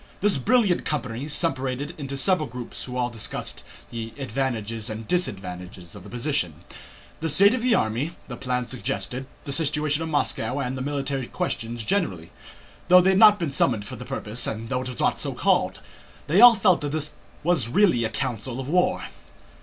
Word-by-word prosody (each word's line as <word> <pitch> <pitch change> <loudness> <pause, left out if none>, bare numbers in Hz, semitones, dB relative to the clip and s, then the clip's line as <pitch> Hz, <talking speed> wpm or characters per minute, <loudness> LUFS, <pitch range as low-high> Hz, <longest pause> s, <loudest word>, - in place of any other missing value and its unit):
This 205 -3 +3
brilliant 210 - +3
company 130 -3 -3
separated 145 -2 -1
into 140 -2 -5
several 180 0 +2
groups 125 0 -7
who 125 -1 -6
all 125 -1 0
discussed 115 -3 -4 0.3
the 115 -1 -5
advantages 115 -4 -2
and 110 0 -6
disadvantages 90 - -3
of 105 - -10
the - - -12
position, 120 - -2 0.6
the 160 - -2
state 200 - +5
of 255 - -1
the 245 -1 +3
army, 120 +10 -1
the 125 - -6
plans 125 -1 -2
suggested, 125 +1 -3 0.2
the 140 - -5
situation 150 0 +1
of 165 - -3
Moscow, 145 -3 0
and 130 -1 -2
military 140 -2 -2
questions 115 0 -3
generally. 100 - -1 0.6
Though 180 +1 +8
they 190 +2 +4
had 190 - +3
not 210 -2 +8
been 170 -6 -2
summoned 115 -7 +1
for 130 - -7
the 125 - -8
purpose, 120 -3 -3
and 110 +1 -4
though 125 -1 0
it 130 - -5
was 125 - -7
not - - +1
so - - -2
called, - - +1 0.4
they 170 +8 +4
all 240 -1 +10
felt 185 -3 +3
that 145 0 -3
this 155 -1 -2 0.3
was 160 -8 +2
really 170 - +3
a 110 - 0
council 120 0 -3
of 130 - -5
war. 180 +4 +2
135 Hz, 185 wpm, -25 LUFS, 115-160 Hz, 0.6 s, all